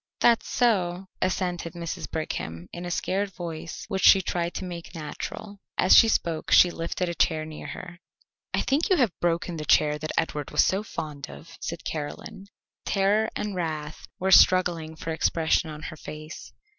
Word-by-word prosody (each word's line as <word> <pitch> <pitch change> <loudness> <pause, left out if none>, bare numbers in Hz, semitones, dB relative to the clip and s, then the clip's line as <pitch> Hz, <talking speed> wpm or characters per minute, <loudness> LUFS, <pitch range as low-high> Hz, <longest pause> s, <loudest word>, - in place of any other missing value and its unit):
"That's 235 -1 +3
so," 190 -6 +1
assented 180 -2 -1
Mrs. 170 -2 -5
Brigham, 85 - -4
in 175 +1 -6
a - - -4
scared 195 +3 -1
voice 170 -1 -6
which 195 -2 -2
she 195 - +8
tried 170 0 -2
to 190 - -4
make 175 -1 -8
natural. 195 +6 -7 0.2
As 185 - +6
she 225 - +8
spoke 165 -7 0
she 175 - +7
lifted 170 +2 -3
a 170 - -2
chair 155 -2 +1
near 155 -1 -8
her. 175 -1 -8 0.5
"I - - +1
think 290 +5 +1
you 375 - +5
have 250 - +3
broken 170 0 0
the 155 - -4
chair 150 0 +3
that 155 0 -4
Edward 150 -3 -1
was - - +4
so 190 +2 +1
fond 150 -8 -6
of," 165 +2 -12
said 170 0 -5
Caroline. 175 +6 -6 0.4
Terror 205 +3 +2
and 210 -1 -3
wrath 155 -4 -4
were 190 +1 0
struggling 175 -4 +5
for 165 - -5
expression 160 0 +1
on 150 0 -8
her 155 - -7
face. 155 +1 -9
170 Hz, 175 wpm, -26 LUFS, 155-190 Hz, 0.5 s, she